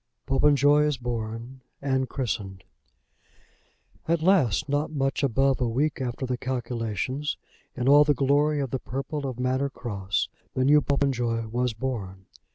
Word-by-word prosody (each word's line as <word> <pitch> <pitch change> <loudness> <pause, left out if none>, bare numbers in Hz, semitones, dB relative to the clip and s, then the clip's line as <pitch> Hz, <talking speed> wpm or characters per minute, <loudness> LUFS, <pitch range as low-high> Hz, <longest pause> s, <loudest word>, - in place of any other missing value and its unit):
POPENJOY 145 +1 +4
IS 150 -2 0
BORN 120 +1 -5 0.2
AND 130 -2 0
CHRISTENED. 100 -7 -4 1.4
At 165 -1 +1
last, 150 - +3
not 145 +2 0
much 135 -3 -1
above 135 0 +2
a 120 - +1
week 140 +5 0
after 125 +1 -3
the 125 -1 -2
calculations, 125 +2 -3 0.4
in 125 0 -2
all 145 +2 +8
the 145 -1 +2
glory 145 +3 +2
of 135 -4 -2
the 130 - -1
purple 135 +3 -4
of 125 -2 -6
Manor 130 +2 0
Cross, 100 -7 -3 0.3
the 130 - +2
new 150 +2 +6
Popenjoy 125 -5 0
was 125 +1 0
born. 105 -6 -5
130 Hz, 145 wpm, -26 LUFS, 120-140 Hz, 1.4 s, all